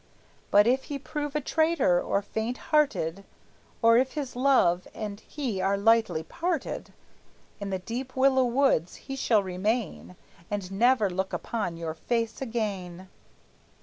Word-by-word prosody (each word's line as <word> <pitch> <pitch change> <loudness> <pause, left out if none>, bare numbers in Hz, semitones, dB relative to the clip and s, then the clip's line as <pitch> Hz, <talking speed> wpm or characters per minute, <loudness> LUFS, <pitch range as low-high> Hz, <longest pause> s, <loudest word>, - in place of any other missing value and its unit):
But 205 0 +6
if 255 +3 +2
he 285 - -4
prove 295 +1 -5
a 300 - +1
traitor, 315 - +2
or 200 - 0
faint 220 +4 -3 0.2
hearted, 200 - +2 0.6
Or 230 0 +7
if 260 +1 +1
his 285 -5 -4
love 245 -10 +3
and 210 -2 -5
he 240 -8 -4
are 195 +1 +1
lightly 225 -5 +3
parted, 335 - -3 0.7
In 200 -1 -4
the 190 - -1
deep 245 +7 -6
willow 260 0 +4
woods 240 - +2
he 270 - -7
shall 225 -6 +2
remain, 190 +1 -2 0.3
And 200 -2 -4
never 230 +2 +3
look 190 +1 -3
upon 205 -7 -3
your 165 -1 -4
face 230 +8 -2
again!" 195 -7 -4
225 Hz, 145 wpm, -27 LUFS, 190-265 Hz, 0.7 s, Or